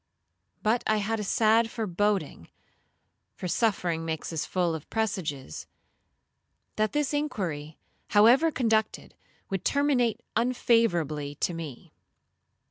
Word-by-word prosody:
But 225 +3 +2
I 215 - +3
had 215 +2 -1
a - - -2
sad 225 +2 +3
foreboding, 205 - -1 0.9
(for 180 - -5
suffering 175 -5 0
makes 160 0 -4
us 160 - -2
full 175 -3 0
of 160 -3 -7
presages), 165 - -3 1.1
that 215 0 0
this 295 -1 0
inquiry, 170 - -3 0.3
however 240 +10 +5
conducted, 220 -7 0 0.4
would 195 -2 -2
terminate 275 -6 +1
unfavourably 175 - +1
to 175 - +1
me. 160 -7 -8
210 Hz, 110 wpm, -27 LUFS, 165-230 Hz, 1.1 s, however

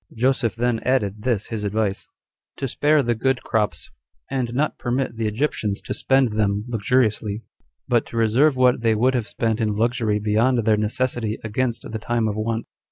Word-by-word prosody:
Joseph 125 -2 +1
then 120 0 0
added 105 -6 0
this 115 -4 0
his 110 -2 -4
advice: 100 -1 -1 0.5
To 135 - -2
spare 145 +3 +2
the 120 -1 +1
good 125 +2 0
crops, 105 -2 -1 0.4
and 130 -3 -1
not 145 +5 -1
permit 125 0 -1
the 110 -1 -1
Egyptians 105 -3 -1
to - - -4
spend 135 -2 +2
them 105 -1 0
luxuriously, 110 -2 0 0.4
but 120 -2 +2
to 115 - -7
reserve 120 +6 +3
what 125 -1 +4
they 115 -1 +2
would 125 +4 +2
have 120 -4 -1
spent 115 0 -1
in 110 - +1
luxury 115 -1 +1
beyond 110 +3 +1
their 110 -1 +4
necessity 110 +1 -1
against 115 +2 -1
the 110 - -5
time 115 0 0
of 105 - -2
want. 115 +1 -2
115 Hz, 175 wpm, -22 LUFS, 110-125 Hz, 0.5 s, what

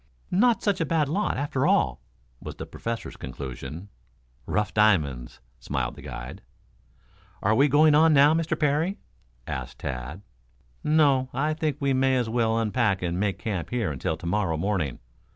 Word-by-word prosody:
"Not 235 +5 +3
such 200 -4 +1
a - - +2
bad 150 -2 +1
lot, 200 +7 0
after 140 -1 0
all," - - +2 0.4
was - - -8
the - - -7
Professor's 115 0 -5
conclusion. 70 +8 -7 0.6
"Rough 105 -4 -1
diamonds," 75 - +1 0.2
smiled 60 0 -3
the - - -12
guide. - - -8 1.0
"Are 105 - +3
we 135 +6 +4
going 150 +2 +5
on 160 +2 +6
now, 145 +1 +6
Mr. 165 0 -1
Parry?" 155 +6 +1 0.5
asked 60 -1 -5
Tad. 70 +8 -6 0.6
"No; 145 -4 +3
I 150 +4 +1
think 155 -3 -2
we 140 -1 +1
may 130 0 +2
as 120 -3 0
well 115 -1 +1
unpack 110 -4 +1
and 90 +1 -1
make 100 -2 0
camp 95 -4 -4
here 115 -9 -1
until 75 +3 -2
to 85 - -11
morrow 90 -2 0
morning. 90 -7 -1
110 Hz, 160 wpm, -26 LUFS, -, 1.0 s, on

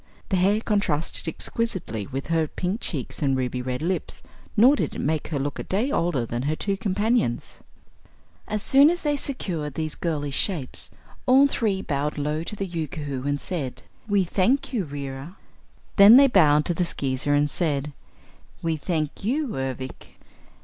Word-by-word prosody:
The 190 - +2
hair 200 +4 +3
contrasted 190 -9 -1
exquisitely 160 - -3
with 135 0 -5
her 160 -1 +2
pink 185 +8 -3
cheeks 140 -8 -5
and 135 -2 +2
ruby 125 -1 -2
red 125 +3 -3
lips, 185 +2 -3 0.3
nor 250 +7 +7
did - - -2
it - - -5
make 155 0 -1
her 155 - -2
look 140 +1 -3
a - - -3
day 220 +9 -1
older 165 - 0
than 120 +1 -3
her 145 +4 -1
two 200 +4 -1
companions. 205 - -1 0.9
As 210 0 -2
soon 280 +3 +6
as 350 +1 -1
they 295 -1 +1
secured 170 - -2
these 155 -1 -2
girlish 145 -4 -2
shapes, 160 -10 0 0.4
all 265 +2 +7
three 210 -8 0
bowed 145 +1 -2
low 150 +2 -1
to 210 - -3
the 195 - -3
Yookoohoo 150 -5 -4
and 145 0 0
said: 145 -9 -5 0.2
"We 205 -2 +3
thank 210 +11 +1
you, 210 -7 0
Reera." 140 +3 -7 0.6
Then 200 +3 +10
they 275 +2 +9
bowed 155 - +4
to 175 - +1
the 180 - 0
Skeezer 140 -3 0
and 145 0 +3
said: 145 -2 -1 0.7
"We 165 -1 0
thank 155 0 -3
you, 275 +6 0
Ervic." 130 0 -5
165 Hz, 170 wpm, -25 LUFS, 145-205 Hz, 0.9 s, Then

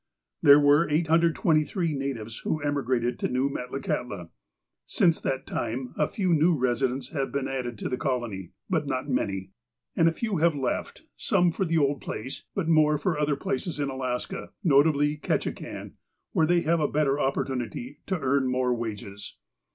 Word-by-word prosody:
There 145 0 +8
were 145 +3 +4
823 165 +1 +2
natives 120 -6 -4
who 155 - -1
emigrated 130 -5 -1
to - - 0
New 130 +2 0
Metla 125 +1 -5
kahtla. 95 -8 -3 0.6
Since 165 -2 +2
that 135 0 -2
time 125 +2 -3
a 150 - +1
few 185 -4 0
new 165 +2 +4
residents 125 +1 0
have 135 -3 -2
been 140 -1 -1
added 125 -3 -4
to - - -4
the 125 - -3
colony, 120 - -2 0.2
but - - 0
not - - -2
many. 95 -1 -2 0.4
And 165 - +4
a - - -1
few 205 +3 -2
have 165 0 +3
left, 135 -2 -3
some 175 -1 +2
for 190 - -1
the 165 -1 +1
old 140 -3 +1
place, 130 +6 -6
but 190 -5 -1
more 155 -2 +4
for 155 +1 -1
other 150 -1 +1
places 150 +4 -3
in 140 -1 -1
Alaska, 130 +7 -4
notably 145 -1 +4
Ketchikan, 150 - -3 0.4
where 160 - +2
they 175 0 +3
have 170 +1 +2
a 150 - +2
better 145 -2 +1
opportunity 130 -1 -2
to 190 -3 -1
earn 135 -1 +1
more 125 -1 +1
wages. 105 -3 -6
140 Hz, 165 wpm, -27 LUFS, 125-155 Hz, 0.6 s, There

